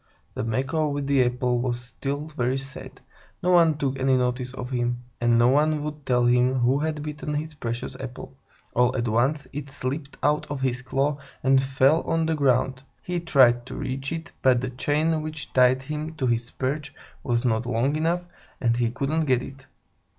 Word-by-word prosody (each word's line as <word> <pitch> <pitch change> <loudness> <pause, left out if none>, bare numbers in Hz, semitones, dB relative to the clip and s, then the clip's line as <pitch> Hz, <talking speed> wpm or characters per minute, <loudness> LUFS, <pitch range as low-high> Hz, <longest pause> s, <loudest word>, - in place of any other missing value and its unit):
The - - -3
Macaw 130 +7 0
with 145 -1 -2
the 140 -2 +4
apple 125 0 0
was 120 -1 -1
still 135 +4 -4
very 130 -3 -1
sad. 135 0 -8 0.4
No 180 - +3
one 165 -4 +5
took 135 -2 -1
any 130 0 +3
notice 125 0 -1
of 125 -1 -7
him, 120 -1 -1 0.2
and 120 -1 +4
no 120 +1 +5
one 150 +2 +2
would 150 -1 -6
tell 125 -1 +3
him 125 +1 +3
who 130 +2 +2
had 155 -1 -2
bitten 150 0 -4
his 155 +1 -3
precious 120 -5 -4
apple. 130 0 -8 0.4
All 125 +2 +2
at 120 -1 -1
once, 130 +6 +1
it 145 0 -5
slipped 140 +2 -5
out 150 +1 +1
of 140 -2 -4
his 125 -1 0
claw 135 +3 0 0.2
and 135 0 +5
fell 135 +4 +3
on 165 0 0
to 160 - +1
the - - -2
ground. 130 -1 +2 0.2
He 180 -1 -2
tried 130 -7 +4
to - - -7
reach 135 +2 -4
it, 165 0 -5
but 130 -2 +4
the 125 0 -3
chain 155 +5 +1
which 155 -1 -6
tied 130 +1 +4
him 155 +3 -5
to 135 - -2
his 120 -1 0
perch 140 +3 -3 0.3
was 120 0 0
not 115 0 +1
long 125 +5 +1
enough, 170 +3 0 0.3
and 115 -2 +2
he 120 -1 +1
couldn't 140 +6 -1
get 130 -3 +2
it. 135 0 -11
135 Hz, 195 wpm, -25 LUFS, 125-150 Hz, 0.4 s, one